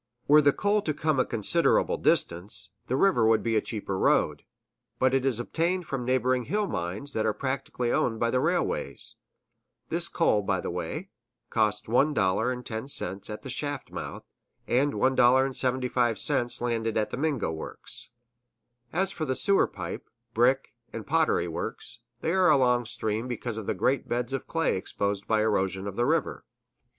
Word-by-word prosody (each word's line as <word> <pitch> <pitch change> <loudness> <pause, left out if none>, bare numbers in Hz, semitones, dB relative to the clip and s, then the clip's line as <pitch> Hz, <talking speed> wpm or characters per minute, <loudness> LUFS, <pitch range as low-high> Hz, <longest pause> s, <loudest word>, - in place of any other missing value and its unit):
Were 150 +1 +7
the 145 -1 +5
coal 205 +6 +1
to 155 -6 -2
come 155 -3 0
a 130 - +3
considerable 105 -3 +2
distance, 90 +5 0 0.2
the 130 - 0
river 130 - +3
would 110 -1 +3
be 115 - 0
the 110 - +3
cheaper 100 -4 -4
road; - - +2 0.6
but 130 0 +2
it 135 0 +2
is 120 -4 +1
obtained 170 +8 -1
from 135 -4 -4
neighboring 130 -1 +1
hill 210 +1 0
mines 100 - -4
that 110 - 0
are 110 -1 0
practically 130 -2 -2
owned 115 -2 0
by 115 0 +1
the 130 - +2
railways. - - -1 0.8
This 170 +1 0
coal, 110 -11 +2
by 95 -2 0
the - - -4
way, 155 - -5 0.4
costs 105 -1 +1
$1.10 115 -3 0
at 105 - -6
the 135 - -7
shaft 145 +2 -3
mouth, - - -6 0.4
and 140 +4 +2
$1.75 125 -2 +1
landed 115 -2 -1
at 110 - 0
the - - -4
Mingo 140 - -1
works. 80 -1 -8 0.8
As 190 +3 +1
for 165 -3 -4
the 130 - -1
sewer 200 +7 +4
pipe, - - -7 0.2
brick, 130 +4 +2 0.2
and 115 - -6
pottery 160 - +2
works, 85 +7 -6 0.2
they 160 - 0
are 185 -1 +4
along 125 -4 +3
stream 110 0 -3
because 120 -2 -4
of 110 - -6
the - - 0
great 135 0 0
beds 120 +2 -1
of 135 - -3
clay 165 - 0
exposed 100 +1 -3
by 110 - +2
the - - +2
erosion 95 -3 0
of 100 -1 -5
the 120 +2 +1
river. - - 0
125 Hz, 165 wpm, -27 LUFS, 110-140 Hz, 0.8 s, Were